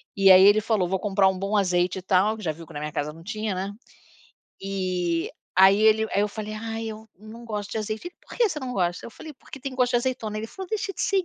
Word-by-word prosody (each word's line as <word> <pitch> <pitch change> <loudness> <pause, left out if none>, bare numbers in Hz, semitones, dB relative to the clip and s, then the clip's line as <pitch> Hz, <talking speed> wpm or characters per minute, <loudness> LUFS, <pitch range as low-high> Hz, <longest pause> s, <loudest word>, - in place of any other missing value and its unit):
e 195 -1 +6
aí 185 +1 +9
ele 205 +2 +6
falou: 210 -5 +1
"Vou 190 +1 -1
comprar 195 -1 +2
um 190 -1 +1
bom 200 +2 -1
azeite 180 -1 +1
e - - -9
tal", 195 +4 +2
que 215 - -10
já 160 - 0
viu 165 +2 -11
que - - -13
na 145 - -5
minha 150 +1 -4
casa 150 +1 -3
não 165 +1 -14
tinha, 215 +1 -3
né. 195 +2 -3 0.9
E 185 -3 -2 0.3
aí 195 +2 +6
ele 220 0 +4
aí 200 - +2
eu 210 - 0
falei: 215 0 -6
"Ai, 225 +1 -5
eu 220 0 -9
não 220 +3 -11
gosto 210 -3 -5
de 220 - -2
azeite". 215 +9 -4
"E - - -19
por - - -12
que 470 -3 +3
você 300 - -4
não 255 -2 -4
gosta?". 175 -4 -1
Eu - - -9
falei: 310 +7 -10
"Porque 275 - -12
tem 270 -1 -5
gosto 250 -1 +2
de 240 - +4
azeitona". 240 -4 -2
Ele 220 - -4
falou: 380 - -9
"Deixa 405 -2 -2
de - - -8
ser 390 -1 +2
210 Hz, 270 wpm, -25 LUFS, 185-225 Hz, 0.9 s, aí